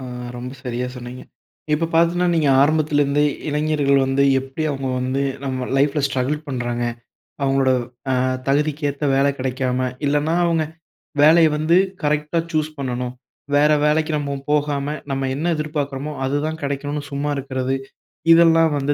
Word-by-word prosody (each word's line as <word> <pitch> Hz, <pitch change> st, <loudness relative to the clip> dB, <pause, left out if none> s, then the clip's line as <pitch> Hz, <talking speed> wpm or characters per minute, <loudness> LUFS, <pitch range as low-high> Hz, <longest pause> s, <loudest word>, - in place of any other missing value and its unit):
அ -, -, -8 dB, 0.3 s
ரொம்ப 125 Hz, +1 st, -6 dB
சரியா 125 Hz, 0 st, -2 dB
சொன்னீங்க. 125 Hz, 0 st, -8 dB, 0.5 s
இப்போ 160 Hz, +2 st, +1 dB
பாத்தீங்கன்னா, 170 Hz, +2 st, +3 dB
நீங்க 155 Hz, -3 st, +2 dB
ஆரம்பத்திலிருந்தே 145 Hz, -1 st, +2 dB, 0.3 s
இளைஞர்கள் 150 Hz, -2 st, +2 dB
வந்து 135 Hz, +1 st, +2 dB, 0.2 s
எப்படி 135 Hz, +4 st, -6 dB
அவங்க 135 Hz, -2 st, -3 dB
வந்து 130 Hz, +2 st, -1 dB, 0.2 s
நம்ப 130 Hz, -2 st, -3 dB
லைஃப்ல 140 Hz, +2 st, +2 dB
ஸ்ட்ரகிள் 135 Hz, +2 st, -1 dB
பண்றாங்க, 120 Hz, -2 st, -2 dB, 0.6 s
அவங்களோட 135 Hz, -1 st, +2 dB, 0.4 s
அ -, -, +2 dB, 0.3 s
தகுதிக்கேத்த 145 Hz, 0 st, 0 dB
வேலை 140 Hz, +1 st, +3 dB
கிடைக்காம. 130 Hz, -1 st, -1 dB, 0.3 s
இல்லனா 150 Hz, +3 st, +1 dB
அவங்க 165 Hz, -2 st, +1 dB, 0.6 s
வேலைய 160 Hz, +2 st, +7 dB
வந்து 155 Hz, +3 st, +2 dB, 0.3 s
கரெக்ட்டா 150 Hz, +2 st, 0 dB
சூஸ் 155 Hz, -1 st, 0 dB
பண்ணணும், 125 Hz, -2 st, -3 dB, 0.4 s
"வேற 150 Hz, +1 st, +4 dB
வேலைக்கு 155 Hz, +1 st, +2 dB
நம்ம 140 Hz, -1 st, -3 dB
போகாம. 145 Hz, -1 st, 0 dB, 0.2 s
நம்ப 135 Hz, 0 st, -1 dB
என்ன 165 Hz, +5 st, 0 dB
எதிர்பார்க்குறோமோ, 150 Hz, -1 st, -3 dB
அதுதான் 150 Hz, +4 st, -2 dB
கிடைக்கணும்னு 145 Hz, +1 st, -3 dB
சும்மா 140 Hz, +1 st, -2 dB
இருக்குறது." 130 Hz, -1 st, -2 dB, 0.6 s
இதெல்லாம் 165 Hz, -1 st, +5 dB
வந்து 140 Hz, +1 st, 0 dB
145 Hz, 135 wpm, -21 LUFS, 135-155 Hz, 0.6 s, வேலைய